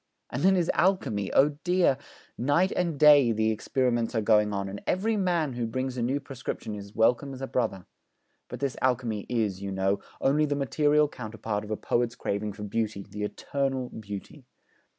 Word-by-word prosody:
And 125 - -3
then 190 +2 +5
his 175 -2 +2
alchemy! 140 - +1
Oh 145 +1 +3
dear, 175 -6 +3 0.4
night 145 +10 +2
and 170 -4 -1
day 145 -5 +7
the 110 0 +1
experiments 120 +1 0
are 110 - +2
going 105 -1 +3
on, 100 -1 -2
and 100 +1 -7
every 215 +5 +1
man 175 -8 0
who 120 -1 -2
brings 130 +2 -3
a 125 - -2
new 130 +4 0
prescription 130 -5 -6
is 100 0 -9
welcome 125 +5 +2
as 130 - -10
a - - 0
brother. 95 -8 -2 0.6
But - - -7
this 140 -2 -1
alchemy 120 -5 0
is, 105 -6 -1
you 100 0 -4
know, 95 +1 0 0.2
only 150 +3 +2
the 145 - 0
material 150 +2 +2
counterpart 110 -5 -5
of 105 - -9
a 110 - -2
poet's 120 0 0
craving 100 +1 -3
for 105 - -8
Beauty, 105 -1 -2
the 105 - -7
eternal 135 +4 -2
Beauty. 100 -2 -8
125 Hz, 185 wpm, -27 LUFS, 105-145 Hz, 0.6 s, day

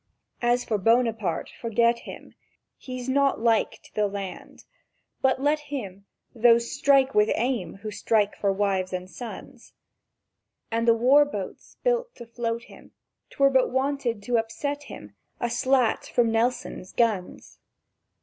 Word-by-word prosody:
"As 240 +1 +2
for 215 -2 -1
Buonaparte, 225 -4 +1
forget 235 +1 +2
him; - - -11 0.5
He's 255 -1 -7
not 275 +1 +2
like 225 -1 +1
to 210 -1 +1
land! 195 -1 -8 0.6
But 260 -1 +2
let 295 +2 +2
him, 200 -8 -6 0.3
Those 235 0 +4
strike 275 -2 +3
with 210 +1 +4
aim 235 -8 -1
who 215 - -4
strike 210 -1 +1
for 200 - 0
wives 195 -2 -1
and 180 0 -4
sons! 205 +7 -10 1.0
And 230 +1 0
the 230 - +6
war 265 +5 +6
boats 205 -10 -7
built - - 0
to 235 - -10
float 230 0 -3
him; - - -16 0.4
'twere 275 0 +3
but 260 -1 +3
wanted 260 -5 -1
to 240 +1 +1
upset 285 +6 -4
him 105 - -11 0.3
A 240 - -1
slat 250 0 +1
from 235 -2 +2
Nelson's 225 -5 -1
guns! 215 -6 -1
235 Hz, 140 wpm, -25 LUFS, 210-260 Hz, 1.0 s, the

